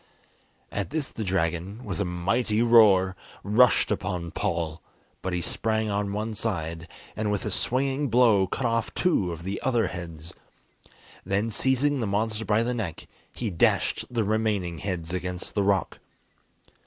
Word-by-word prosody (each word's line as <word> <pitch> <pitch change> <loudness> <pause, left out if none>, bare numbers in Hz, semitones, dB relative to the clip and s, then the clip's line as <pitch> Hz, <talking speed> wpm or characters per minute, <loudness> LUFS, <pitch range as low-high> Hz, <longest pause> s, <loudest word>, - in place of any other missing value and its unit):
At 100 - -3
this 150 -2 -3
the 110 - -4
dragon, 95 +4 -2
with 95 -6 -4
a - - 0
mighty 105 +6 0
roar, 100 -5 +6 0.3
rushed 115 +5 +4
upon 90 -3 -2
Paul, 85 -1 -2 0.4
but 95 - -3
he 90 -1 -1
sprang 110 +2 -1
on 100 0 -1
one 110 +2 -3
side, 85 -6 -3 0.3
and 105 -1 -1
with 105 - -2
a - - -2
swinging 135 +3 0
blow 115 -5 +4
cut 125 - -3
off 115 -1 0
two 130 - +1
of 85 0 -7
the 95 +2 -4
other 120 -4 +2
heads. 85 -3 -8 0.9
Then, 100 +4 0
seizing 135 +4 +2
the 115 - -1
monster 105 +2 -1
by 110 +2 +2
the 125 +1 -1
neck, 100 -9 -4 0.3
he 115 -4 -4
dashed 85 - +2
the 120 -2 0
remaining 105 -5 0
heads 85 -3 -4
against 90 0 -4
the 105 - +1
rock. 100 -1 +1
100 Hz, 155 wpm, -26 LUFS, 90-115 Hz, 0.9 s, roar